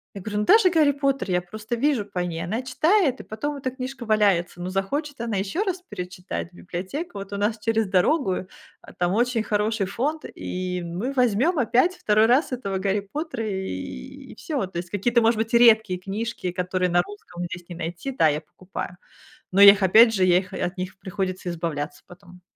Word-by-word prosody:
Я 195 - -6
говорю, 210 +1 -4
ну 210 - 0
даже 430 -3 +6
Гарри 310 -4 +4
Поттер, 275 -5 -1
я 180 0 +2
просто 215 +6 -5
вижу 265 -3 +1
по 195 -3 -5
ней. 170 -2 -3
Она 220 +9 -3
читает, 310 +2 +2
и - - -13
потом, 285 +7 -4
эта 260 -1 -2
книжка 260 -1 -6
валяется. 200 -5 +2
Ну 180 - -3
захочет, 275 +8 -2
она 225 -4 -2
ещё 200 - -1
раз 370 -1 -3
перечитать, 180 -3 -6
библиотека, 190 - -5
вот, 195 +1 -7
у - - -2
нас 215 +2 0
через 225 -1 0
дорогу, 190 - +1 0.3
а - - -14
там 175 +1 0
очень 235 0 +1
хороший 210 -1 0
фонд, 290 +10 -2
и 180 -1 -4
мы 185 +11 -3
возьмём 255 - +2
опять, 255 +10 +2
второй 215 -4 +3
раз, 260 +4 +3
этого 195 -6 -3
Гарри 200 0 0
Поттера, 295 -7 -3
и 190 -1 -6
всё. 280 - -3
То - - -6
есть, 175 0 -7
какие-то, 235 +4 +2
может 225 0 +3
быть, 225 +1 -2
редкие 215 -5 +4
книжки, 205 +1 -4
которые 180 0 0
на 175 0 +4
русском 180 -4 -9
здесь 175 0 -8
не 175 - -7
найти, 170 +10 -5
да, 160 - +3
я 150 +1 0
покупаю, 180 +2 -8 0.6
но 195 +2 +3
я 200 0 +11
их, 195 -1 -3
опять 225 +5 +7
же, 190 -3 +3
я 180 -1 +5
их 185 0 -9
и - - -5
от 180 +2 -5
них 185 +1 -5
приходится 185 -1 -3
избавляться 160 -3 -4
потом. 180 0 -15
205 Hz, 200 wpm, -24 LUFS, 180-250 Hz, 0.6 s, я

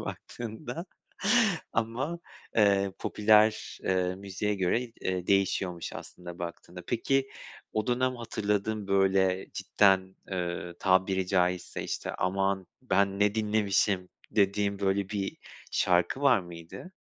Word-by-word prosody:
baktığında 120 +8 -6 0.9
ama, 125 +9 -2 0.4
eee, 100 -2 +4
popüler, 110 +1 +3
eee, 90 -1 +1
müziğe 100 +2 -2
göre, 95 +4 +1 0.2
eee, 90 -1 -2
değişiyormuş 95 -3 +1
aslında 85 0 -9
baktığında. 85 +1 -7
Peki 135 +3 +1 0.4
o 110 -1 -1
dönem 130 +1 +1
hatırladığın, 105 -2 -2
böyle, 95 -1 +3
cidden, 95 -2 +2 0.2
ııı, 85 -1 -3
tabiri 95 0 +2
caizse, 90 -1 0
işte, - - -4
aman 95 0 0 0.2
ben 100 -5 +1
ne 105 +1 +3
dinlemişim, 105 -3 +1 0.2
dediğin 100 -1 +1
böyle 95 0 0
bir 100 -2 -3 0.4
şarkı 90 +8 +2
var 130 -6 +6
mıydı? 85 - -10
100 Hz, 110 wpm, -29 LUFS, 95-110 Hz, 0.9 s, var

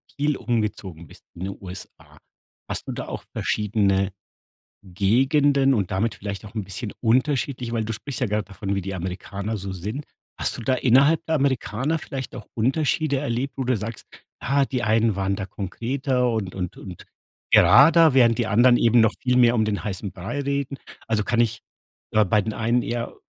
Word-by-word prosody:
viel 145 0 0
umgezogen 105 - -3
bist - - -17
in 90 +2 -6
den 100 - -6
USA. 95 0 -11 0.5
Hast - - -3
du - - -3
da - - -5
auch - - -6
verschiedene 100 -2 0 0.7
Gegenden 135 - +3
und 100 -6 0
damit 105 +4 0
vielleicht 100 0 -6
auch 105 - -11
'n 110 - -2
bisschen 100 +3 -6
unterschiedliche 125 0 0
weil 115 -2 -1
du 115 - -3
sprichst 135 +5 -6
ja 125 - +2
grad 105 -1 -2
davon, 100 +1 -3
wie 100 - -1
die 95 +2 -5
Amerikaner 95 +4 -4
so 95 0 -6
sind. 105 - -5 0.3
Hast - - -1
du - - -7
da 130 +3 +1
innerhalb 140 +7 +4
der 160 - 0
Amerikaner 135 +1 0
vielleicht 135 -2 -6
auch 115 -4 -9
Unterschiede 140 +4 +1
erlebt, 135 0 -2
wo 135 - -1
du 130 0 +1
sagst: 110 +2 -6 0.3
„Ah, 140 +1 +1
die 125 -2 -3
einen 110 -1 +2
waren 95 0 -1
da 100 -1 -4
konkreter 125 +6 -1
und 100 -5 -3
und 90 -2 -5
und 90 -4 -10 0.5
gerader, 150 - +7
während 120 -3 +5
die 120 - 0
anderen 120 +3 +5
eben 120 0 +4
noch 110 -1 +3
viel 125 -1 +2
mehr 120 -1 +5
um 110 -2 +2
den 105 -1 -2
heißen 100 -2 -4
Brei 95 +11 -5
reden.“ 140 0 -2 0.3
Also 110 -2 +1
kann 120 +1 0
ich, 115 -2 +1 0.5
äh, 110 0 +4
bei 105 +3 +2
den 110 +2 -4
einen 115 +2 +1
eher 120 0 -4
115 Hz, 190 wpm, -23 LUFS, 100-130 Hz, 0.7 s, gerader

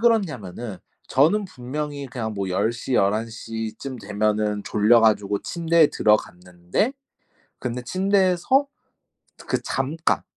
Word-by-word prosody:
그렇냐면은 125 - 0 0.3
저는 170 +10 +3
분명히 145 -2 -5
그냥 110 -2 -4
뭐 100 -2 -3
10 100 +5 +1
시, 120 +2 -4
11 110 +2 +2
시쯤 110 +3 -6
되면은 105 0 0
졸려 110 +3 +4
가지고 105 -2 +2
침대에 165 -2 +3
들어갔는데 90 - 0 0.7
근데 125 0 -3
침대에서 190 - +2 0.8
그 - - 0
잠깐, 150 +5 0
120 Hz, 235 characters per minute, -23 LUFS, 105-160 Hz, 0.8 s, 졸려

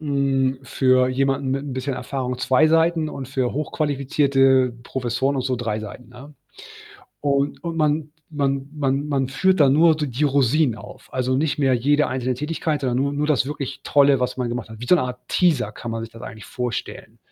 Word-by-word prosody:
Hm, 135 -3 0
für 130 -1 +2
jemanden 135 +1 0
mit 135 +1 -1
'n 140 - -5
bisschen 130 +1 -3
Erfahrung 125 0 -4
2 130 +4 +3
Seiten 165 0 +2
und 135 -4 -7
für 130 -2 -1
hochqualifizierte 135 -3 +1
Professoren 130 +2 -1
und 130 - -1
so 130 0 -1
3 115 -3 -2
Seiten, 110 +3 -9
ne? 130 +4 -13 0.9
Und 140 0 0
und 170 -2 -4
man 150 -1 0 0.2
man 140 -2 -1
man 140 -1 -1
man 135 -3 0
führt 175 +7 +1
dann 135 -2 +6
nur 160 +2 +5
d 150 -1 -2
die 130 +3 -1
Rosinen 140 -2 +2
auf, 100 - -13
also, 130 0 0
nicht 150 +2 0
mehr 135 -3 +3
jede 145 +5 +2
einzelne 130 0 -2
Tätigkeit, 150 +2 -2
sondern 125 -3 -1
nur 140 +1 0
nur 145 +1 -1
das 145 -5 +2
wirklich 140 -2 -5
Tolle, 140 -2 +4
was 125 - -1
man 125 -2 -2
gemacht 120 0 -4
hat. 110 0 -11
Wie 120 - -6
so 180 - +6
eine 160 - 0
Art 125 0 -7
„Teaser“ 165 -9 +2
kann 120 - -7
man 115 0 -4
sich 115 - -12
das 115 - -12
eigentlich 110 -3 -9
vorstellen. 125 -2 -5
135 Hz, 200 wpm, -22 LUFS, 125-145 Hz, 0.9 s, dann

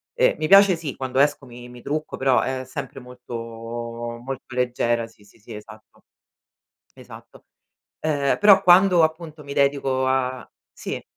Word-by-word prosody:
eh - - +2
mi 155 - -1
piace 195 +1 +6
sì, 160 -4 -6
quando 130 0 -3
esco 145 -1 +1
mi 120 0 -12
mi 125 -1 -14
trucco, 155 +1 -4
però 130 -2 +2
è 130 0 -3
sempre 135 0 -7
molto 125 -1 -11 0.9
molto 130 -1 -8
leggera, 120 -2 0
sì, 110 -2 -20
sì, 105 - -23
sì, 115 +1 -13
esatto. 110 +1 -14 0.9
Esatto, - - -15 0.6
ehm, 145 -3 0
però 205 -2 +7
quando 180 -1 +6
appunto 160 -1 -5
mi 140 - -8
dedico 140 -2 0
a 130 -1 -2 0.2
sì. - - -7
135 Hz, 150 wpm, -22 LUFS, 125-155 Hz, 0.9 s, però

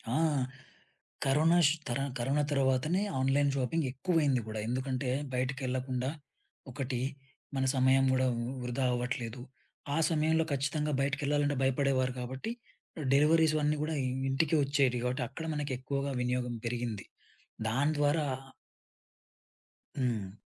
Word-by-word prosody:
ఆ! - - +3 1.1
కరోనాష్ 155 +3 +5 0.2
తరాన్ 135 +3 -1
కరోనా 135 +5 +1
తర్వాతనే 140 +6 +2 0.2
online 140 +2 +3
shopping 140 +4 0
ఎక్కువైంది 145 -3 +1
గూడా. 110 0 -4
ఎందుకంటే, 130 +1 -1 0.2
బయటికెళ్లకుండా 130 0 -1 0.6
ఒకటి 125 -1 -3 0.6
మన 135 - +1
సమయం 130 +1 +4
గూడా 130 0 +2 0.4
వృధా 125 +2 -1
అవ్వట్లేదు. 120 -1 -3 0.5
ఆ - - +1
సమయంలో 160 0 +2
ఖచ్చితంగా 150 +2 0
బయటికెళ్లాలంటే 145 0 +1
భయపడేవారు 130 -1 +2
కాబట్టి, 130 - -4 0.6
డెలివరీస్ 155 +2 +5
ఇవన్నీ 150 0 +1
కూడా 155 0 -2
ఇ - - +1 0.2
ఇంటికి 150 +4 +2
ఒచ్చేటివి 135 -4 +1
కాబట్టి, 125 0 0
అక్కడ 160 +4 -6
మనకెక్కువగా 140 0 -2
వినియోగం 125 -1 -1
పెరిగింది. 115 -4 -3 0.6
దాని 140 +6 +2
ద్వారా 145 +1 +2 1.7
హ్మ్. 110 -7 -2
135 Hz, 110 wpm, -31 LUFS, 125-150 Hz, 1.7 s, కరోనాష్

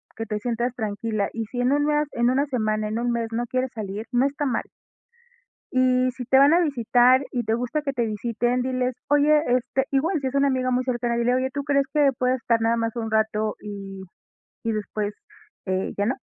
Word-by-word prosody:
que 225 - -4
te 210 -1 -3
sientas 235 +2 -2
tranquila. 215 -2 -2
Y 225 -1 -3
si 245 +3 -6
en 250 +2 +2
1 290 0 +2
mes, 300 0 +1
en 240 0 +2
1 270 +3 +2
semana, 215 -5 -1
en 215 +2 -2
1 240 0 0
mes 235 -1 -1
no 235 +1 0
quieres 255 0 -1
salir, 210 0 -5
no 245 +2 +3
está 285 +1 -2
mal. 260 - 0 1.1
Y 255 0 +3
si 250 0 -7
te 265 +2 +4
van 280 +3 +6
a 345 - +5
visitar 255 -3 +4
y 245 -2 -1
te 220 0 0
gusta 250 +6 -1
que 285 -2 -2
te 240 -3 0
visiten, 235 +3 -1
diles: 255 0 -1
"Oye, 295 +1 +4
este". 255 +2 +1
Igual, 310 +6 +1
si 265 - -1
es 260 - -4
una 280 0 +3
amiga 255 -1 0
muy 250 +1 +1
cercana, 240 -2 -1
dile: 240 +1 +2
"Oye, 260 +1 0
¿tú 285 0 -3
crees 280 -1 +2
que 290 -2 +4
puedas 255 +1 +1
estar 230 -1 +1
nada 230 +1 +2
más 230 0 -2
un 225 -2 -3
rato 220 -1 0
y 195 -2 -8 0.6
y 225 - +1
después, 210 -1 -3 0.5
eh, 185 0 -1
¿ya 205 - +1
no?". 245 - +1
245 Hz, 220 wpm, -24 LUFS, 225-265 Hz, 1.1 s, van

